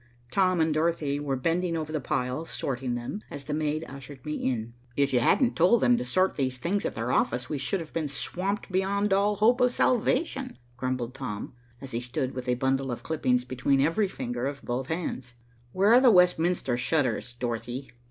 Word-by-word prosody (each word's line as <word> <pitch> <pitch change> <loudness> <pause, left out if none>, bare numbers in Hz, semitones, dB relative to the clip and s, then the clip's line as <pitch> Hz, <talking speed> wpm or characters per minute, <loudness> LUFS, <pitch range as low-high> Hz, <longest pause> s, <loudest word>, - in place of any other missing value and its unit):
Tom 185 -2 +3
and 160 -1 +2
Dorothy 155 -3 0
were 140 -2 -1
bending 165 +5 0
over 155 -1 -4
the 155 -2 -2
piles 125 +5 -2
sorting 125 -2 -2
them, 120 - -5
as 140 -1 -8
the 150 - -3
maid 155 +1 -1
ushered 135 -1 -10
me 150 - -2
in. 115 -5 -2 0.2
"If 140 -1 +1
you 125 - +5
hadn't 240 - +3
told 185 +7 +4
them 245 - +5
to 245 - -2
sort 185 -5 +1
these 130 -2 -1
things 185 +9 -1
at - - -6
their 115 +3 -2
office, 125 +2 +1
we 150 - -1
should 165 +8 -1
have 160 - -10
been 160 -2 -1
swamped 190 +9 -3
beyond 195 +2 +1
all 205 +2 +3
hope 235 +5 +3
of 250 0 +4
salvation," 255 +2 +1 0.2
grumbled 125 -1 -2
Tom, 125 -7 -5 0.3
as 135 -1 -7
he 115 - -1
stood 130 +2 -3
with 125 -1 -6
a 125 - +3
bundle 135 +1 0
of 120 - -5
clippings 125 -6 +1
between 130 +2 +1
every 165 +9 +2
finger 120 -6 -3
of 140 0 -6
both 125 +2 -3
hands. 140 -7 -4 0.4
"Where 200 - +4
are 250 - +7
the 260 - +7
Westminster 180 - +3
shutters, 125 -2 0
Dorothy?" 120 +2 -4
145 Hz, 200 wpm, -27 LUFS, 125-180 Hz, 0.4 s, are